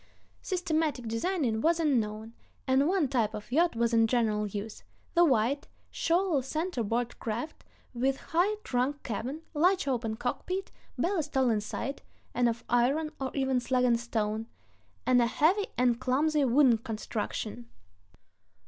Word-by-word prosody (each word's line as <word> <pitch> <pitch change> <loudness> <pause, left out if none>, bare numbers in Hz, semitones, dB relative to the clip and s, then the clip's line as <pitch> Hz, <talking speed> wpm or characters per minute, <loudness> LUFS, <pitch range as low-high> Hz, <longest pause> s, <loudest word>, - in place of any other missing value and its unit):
Systematic 315 - -1
designing 230 - 0
was 335 +4 +3
unknown, 225 -7 0 0.3
and... 265 +2 +3
one 360 -4 +2
type 230 -5 0
of 210 +3 -9
yacht 330 +1 +3
was 235 0 +1
in 225 0 +5
general 220 -3 +1
use, 205 +2 -6 0.3
the 345 - +5
wide, 270 0 +2 0.2
shoal 340 -3 +1
center 310 +2 -2
board 235 +2 -2
craft, 235 +7 -4 0.3
with 265 +2 0
high 360 +6 +1
trunk 260 +3 -1
cabin, 255 +8 -4
large 360 +2 +2
open 230 -4 -1
cockpit, 365 - -3 0.3
ballast 320 -6 -1
all 260 -2 +4
inside 220 +5 -3 0.3
(and 245 -1 +3
of 230 0 -4
iron, 275 +6 +2
or 265 - -1
even 265 -2 +1
slag 250 +1 +1
and 235 -2 +3
stone), 220 -1 -2 0.6
and 245 -1 +4
a 235 - +3
heavy 360 - +2
and 245 -1 +2
clumsy 290 +4 +2
wooden 250 -2 +4
construction. 220 +1 -4
255 Hz, 140 wpm, -29 LUFS, 230-310 Hz, 0.6 s, in